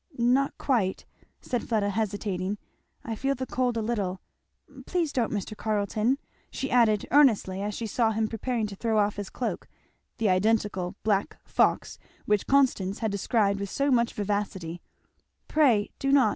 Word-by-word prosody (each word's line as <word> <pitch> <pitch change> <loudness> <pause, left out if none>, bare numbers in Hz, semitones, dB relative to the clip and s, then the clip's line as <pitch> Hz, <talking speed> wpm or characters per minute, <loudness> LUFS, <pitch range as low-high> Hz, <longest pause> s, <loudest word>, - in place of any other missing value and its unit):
"Not 250 +4 +2
quite," 215 -9 0 0.4
said 245 - -3
Fleda 210 -3 +1
hesitating, 205 -2 -2 0.5
"I 230 - -4
feel 270 +5 -1
the 260 0 -4
cold 250 -2 0
a 225 - -1
little. 200 -5 -2 0.7
Please 340 -5 0
don't, 240 -3 0
Mr. 210 0 -3
Carleton! 215 +4 0 0.2
" - - -36
she 270 - -4
added 225 -4 +4
earnestly 225 -9 +4
as 205 +1 -3
she 230 - -4
saw 225 +1 +1
him 220 0 0
preparing 230 +1 -2
to 205 -1 -6
throw 220 +2 0
off 205 -1 +2
his 205 -1 -4
cloak, 250 - -4 0.5
the 225 - +1
identical 190 -1 +1
black 205 -2 0
fox - - +1 0.3
which 210 -1 +1
Constance 245 -9 +2
had 220 -2 -1
described 200 0 +1
with 200 -1 -4
so 280 +6 0
much 235 -2 +2
vivacity; 195 -5 -3 0.7
"pray 250 -10 +3
do 275 - 0
not! 270 -6 +5
220 Hz, 160 wpm, -27 LUFS, 200-245 Hz, 0.7 s, not